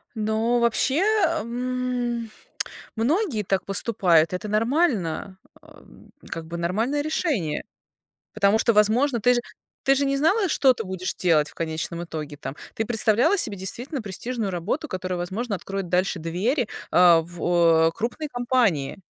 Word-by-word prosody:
Но 220 +2 +1
вообще, 235 +5 +2 0.4
м, 245 -1 -3 0.6
многие 270 - 0
так 195 -1 -1
поступают. 185 -6 +2
Это 185 +4 -4
нормально 215 - 0 0.2
а, - - -17 0.5
как 165 - -5
бы 170 +1 -6
нормальное 220 +12 0
решение. 280 - -1 0.7
Потому 210 +1 +3
что, 230 - +3
возможно, 235 +5 +3
ты 245 +4 +4
же 240 - +1 0.4
ты 275 - +4
же 280 +1 +1
не 275 0 +1
знала, 375 +7 +2
что 265 -4 +4
ты 225 - -5
будешь 185 -2 -4
делать 160 -4 +2
в - - -15
конечном 165 +1 -4
итоге, 155 -3 -6
там. 145 0 -7 0.2
Ты 225 - -1
представляла 235 - +3
себе 210 - 0
действительно 240 - -4
престижную 215 +1 -4
работу, 200 - -3
которая, 185 -2 -3
возможно, 200 +6 -3
откроет 195 +1 -5
дальше 180 +1 0
двери, 205 - -1 0.2
а, 175 -2 +6
в 170 -1 +2
крупные 245 +7 -3
компании. 240 - 0
215 Hz, 140 wpm, -24 LUFS, 175-250 Hz, 0.7 s, а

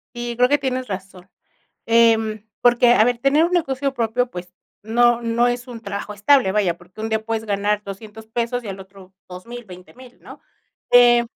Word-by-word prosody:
Sí, 240 0 -4
creo 250 +2 +3
que 290 - +3
tienes 255 -2 -3
razón. 190 -1 -8 0.6
Em, 225 -2 +2 0.2
porque 240 0 +4
a 215 - +5
ver 245 -1 0
tener 280 +5 +3
un 340 - -1
negocio 275 -5 -1
propio 245 0 -1
pues 180 0 -9 0.3
no 240 +2 +3
no 235 +1 +1
es 245 +1 -3
un 240 -3 -9
trabajo 200 0 -6
estable 210 0 +3
vaya 190 -5 0
porque 180 +4 -15
un 220 - -3
día 220 0 -2
puedes 225 -1 -3
ganar 205 0 -1
$200 210 +2 -10
pesos 240 +2 -2
y 215 - -9
al 195 - -6
otro 190 0 -15 0.2
$2,000, 235 +7 -9
$20,000, 215 +7 -15
¿no? - - -13 0.5
Eh 240 -1 +6
230 Hz, 185 wpm, -21 LUFS, 200-245 Hz, 0.6 s, Eh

